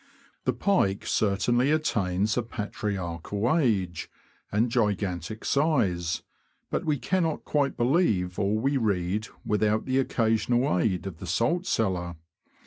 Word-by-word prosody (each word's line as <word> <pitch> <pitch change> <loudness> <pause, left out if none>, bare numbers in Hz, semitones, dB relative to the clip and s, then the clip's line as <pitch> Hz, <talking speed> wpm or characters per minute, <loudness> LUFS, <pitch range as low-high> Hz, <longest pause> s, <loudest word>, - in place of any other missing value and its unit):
The - - +2
pike 100 - +1
certainly 120 +6 +2
attains 105 -10 +1
a 125 - +1
patriarchal 105 - -2
age 95 - 0 0.4
and 115 +3 +1
gigantic 105 - -1
size, 95 - +1 0.5
but - - -1
we 150 -2 +1
cannot 165 +1 -1
quite 145 -2 0
believe 120 - +1
all 105 +1 +1
we 135 +5 +1
read 105 -2 0 0.2
without 105 +1 +1
the 130 0 +1
occasional 120 +1 +1
aid 95 -3 0
of 90 -5 -6
the 95 - -7
salt 125 - 0
cellar. 90 -5 0
110 Hz, 125 wpm, -27 LUFS, 95-130 Hz, 0.5 s, The